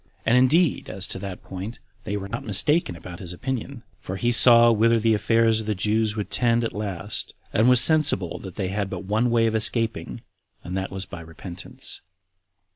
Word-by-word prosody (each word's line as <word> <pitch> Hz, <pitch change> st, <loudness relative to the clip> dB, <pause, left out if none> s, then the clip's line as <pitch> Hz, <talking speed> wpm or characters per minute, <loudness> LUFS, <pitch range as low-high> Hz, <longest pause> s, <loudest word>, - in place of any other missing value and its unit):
And 115 Hz, -, +3 dB
indeed, 140 Hz, +6 st, +2 dB
as 95 Hz, 0 st, -1 dB
to -, -, -2 dB
that 95 Hz, -2 st, -8 dB
point, 95 Hz, +5 st, -8 dB, 0.3 s
they 100 Hz, -, -3 dB
were 100 Hz, -1 st, -6 dB
not 115 Hz, +4 st, -6 dB
mistaken 150 Hz, -, +2 dB
about 85 Hz, +1 st, -11 dB
his 90 Hz, -2 st, -6 dB
opinion; 130 Hz, +3 st, -6 dB, 0.2 s
for 95 Hz, -, -7 dB
he 120 Hz, +5 st, -1 dB
saw 120 Hz, -1 st, +7 dB
whither 115 Hz, +1 st, +2 dB
the 110 Hz, 0 st, +2 dB
affairs 110 Hz, +2 st, +2 dB
of 110 Hz, -, -10 dB
the 105 Hz, -, -1 dB
Jews 105 Hz, +2 st, -1 dB
would 105 Hz, -2 st, -5 dB
tend 120 Hz, -1 st, +1 dB
at 115 Hz, -, -3 dB
last, 100 Hz, -2 st, -4 dB, 0.2 s
and 110 Hz, +4 st, +3 dB
was 125 Hz, -1 st, +8 dB
sensible 150 Hz, -, +4 dB
that 95 Hz, -3 st, -10 dB
they 95 Hz, -3 st, -3 dB
had 100 Hz, 0 st, -3 dB
but -, -, -6 dB
one 110 Hz, +5 st, 0 dB
way 115 Hz, -1 st, +2 dB
of 110 Hz, -, 0 dB
escaping, 115 Hz, +1 st, -1 dB, 0.4 s
and 90 Hz, -, -6 dB
that 95 Hz, 0 st, -3 dB
was 95 Hz, 0 st, -6 dB
by 85 Hz, -, -10 dB
repentance. 85 Hz, +2 st, -8 dB
110 Hz, 200 wpm, -23 LUFS, 95-115 Hz, 0.4 s, was